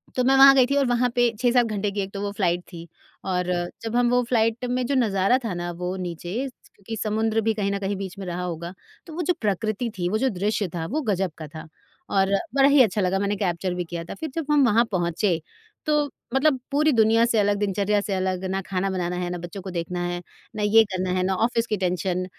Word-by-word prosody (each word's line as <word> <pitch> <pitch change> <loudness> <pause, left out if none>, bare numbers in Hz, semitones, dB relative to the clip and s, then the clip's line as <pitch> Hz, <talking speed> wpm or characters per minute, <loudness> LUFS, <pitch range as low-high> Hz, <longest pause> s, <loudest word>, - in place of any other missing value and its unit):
तो 255 - +1
मैं 270 +2 +4
वहाँ 275 0 +9
गई 260 -2 +6
थी 280 - 0
और 275 - +3
वहाँ 245 0 +2
पे 245 -1 +4
6-7 245 0 +3
घंटे 210 -2 -2
की 200 0 -2
एक 195 0 -5
तो 200 - -4
वो 205 - -2
फ्लाइट 180 -3 0
थी 170 -1 -9 0.4
और 180 -1 0 0.4
जब 225 +1 -3
हम 245 -1 +3
वो 245 0 +3
फ्लाइट 230 0 +1
में 250 0 0
जो 275 - 0
नज़ारा 215 -1 +3
था 205 - -2
ना 175 0 -4
वो 180 +1 -2
नीचे 175 0 -5 0.2
स - - -19 0.2
क्योंकि 225 +3 -7
समुद्र 220 +1 0
भी 220 +1 +1
कहीं 200 -2 -1
न 200 - -2
कहीं 195 0 -2
बीच 195 0 -6
में 195 - -5
रहा 180 0 -4
होगा। 170 0 -5 0.3
तो 325 - -10
वो 350 - -3
जो 360 - +2
प्रकृति 215 +3 -1
थी 175 -1 -1
वो 215 - +1
जो 265 +4 +1
दृश्य 205 +1 0
था 165 -1 -3
वो 310 +3 0
ग़ज़ब 195 - -1
का 155 -2 -7
था। 155 +2 -10 0.4
और 195 -1 +3 0.3
बड़ा 275 0 +6
ही 285 -1 +6
अच्छा 210 -1 0
लगा 190 +1 +1
मैंने 200 +1 0
कैप्चर 180 -1 -1
भी 180 0 -2
किया 170 0 -5
था 170 - -8
फिर 320 - -4
जब 325 -3 -2
हम 290 -2 +5
वहाँ 235 +1 +4
पहुँचे 175 -1 0 0.4
तो 300 -1 +1 0.2
मतलब 270 -1 +3
पूरी 305 +2 +3
दुनिया 225 0 +4
से 230 -2 +1
अलग 205 0 +2
दिनचर्या 205 0 +1
से 200 - -3
अलग 185 -1 -1
ना 195 - 0
खाना 195 0 -1
बनाना 180 -2 -2
है 180 0 -2
ना 180 - -3
बच्चों 175 +3 -7
को 190 - -7
देखना 175 +1 -3
है 175 0 -3 0.3
ना 210 - -2
ये 220 +2 +6
करना 185 0 -2
है 185 - +1
ना 190 +1 +1
ऑफ़िस 235 -1 0
की 210 - -1
टेंशन 180 0 -1
200 Hz, 250 wpm, -24 LUFS, 180-235 Hz, 0.4 s, वहाँ